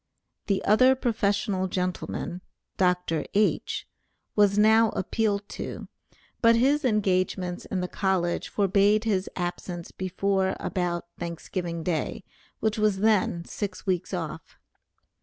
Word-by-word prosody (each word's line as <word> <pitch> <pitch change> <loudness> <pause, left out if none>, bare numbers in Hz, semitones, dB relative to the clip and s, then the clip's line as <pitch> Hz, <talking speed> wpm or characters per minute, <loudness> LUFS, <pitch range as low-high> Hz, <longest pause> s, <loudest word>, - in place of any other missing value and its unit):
The 195 -2 0
other 255 +5 +6
professional 205 -5 0
gentleman 180 -1 -3 0.3
(Dr. 180 -3 +1
H.), 210 +1 +1 0.5
was 205 -1 +4
now 220 +1 +6
appealed 205 +1 0
to, - - -6 0.5
but 230 -1 +6
his 280 +6 +3
engagements 185 -5 0
in 185 - -2
the 180 - -2
college 185 -3 0
forbade 205 +2 +3
his 200 -4 0
absence 175 -1 -4
before 190 +1 0
about 175 -2 -2
Thanksgiving 170 0 -4
day, 165 -3 -2 0.4
which 220 0 0
was 210 -2 +2
then 200 -5 +2
six 200 -3 -5
weeks 185 -2 -1
off. - - -5
195 Hz, 115 wpm, -26 LUFS, 180-215 Hz, 0.5 s, other